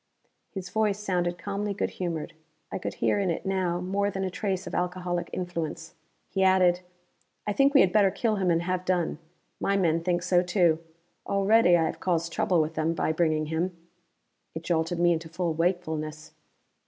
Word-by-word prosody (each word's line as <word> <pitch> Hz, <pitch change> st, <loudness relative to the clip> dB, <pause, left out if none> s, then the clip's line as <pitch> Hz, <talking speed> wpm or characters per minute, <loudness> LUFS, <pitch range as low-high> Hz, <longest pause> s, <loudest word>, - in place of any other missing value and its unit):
His 185 Hz, -2 st, -7 dB
voice 215 Hz, -2 st, +1 dB
sounded 175 Hz, -4 st, -1 dB
calmly 200 Hz, +3 st, -3 dB
good -, -, -1 dB
humored; 170 Hz, -4 st, -4 dB, 0.4 s
I -, -, -3 dB
could -, -, -4 dB
hear -, -, +1 dB
in 195 Hz, -2 st, 0 dB
it 170 Hz, -, -3 dB
now 185 Hz, -2 st, 0 dB
more 195 Hz, +3 st, 0 dB
than 195 Hz, -1 st, -3 dB
a 190 Hz, -, -2 dB
trace 190 Hz, -1 st, -2 dB
of -, -, -7 dB
alcoholic 180 Hz, -1 st, -2 dB
influence. 170 Hz, -3 st, -4 dB, 0.3 s
He 195 Hz, -, -2 dB
added, 185 Hz, -2 st, +4 dB, 0.7 s
"I 205 Hz, -, -1 dB
think 275 Hz, +5 st, +3 dB
we 275 Hz, -, +8 dB
had 180 Hz, -, +3 dB
better 205 Hz, -2 st, +5 dB
kill 215 Hz, +3 st, 0 dB
him 190 Hz, -2 st, +1 dB
and 170 Hz, 0 st, +2 dB
have 180 Hz, 0 st, -1 dB
done. 180 Hz, -4 st, 0 dB, 0.4 s
My 200 Hz, -, +1 dB
men 165 Hz, -3 st, +2 dB
think 175 Hz, 0 st, 0 dB
so, 180 Hz, -1 st, +3 dB
too; 175 Hz, -3 st, +2 dB, 0.5 s
already 200 Hz, -2 st, +4 dB
I 165 Hz, -, +2 dB
have -, -, -3 dB
caused 170 Hz, -2 st, -1 dB
trouble 180 Hz, -3 st, +2 dB
with 155 Hz, +1 st, 0 dB
them, 160 Hz, +1 st, 0 dB
by 160 Hz, -, 0 dB
bringing 155 Hz, -1 st, +1 dB
him." 175 Hz, +2 st, -1 dB, 0.8 s
It 160 Hz, -, -5 dB
jolted 165 Hz, 0 st, 0 dB
me 175 Hz, 0 st, +4 dB
into 160 Hz, 0 st, -4 dB
full 170 Hz, 0 st, -1 dB
wakefulness. 160 Hz, -3 st, -2 dB
180 Hz, 185 wpm, -27 LUFS, 165-190 Hz, 0.8 s, we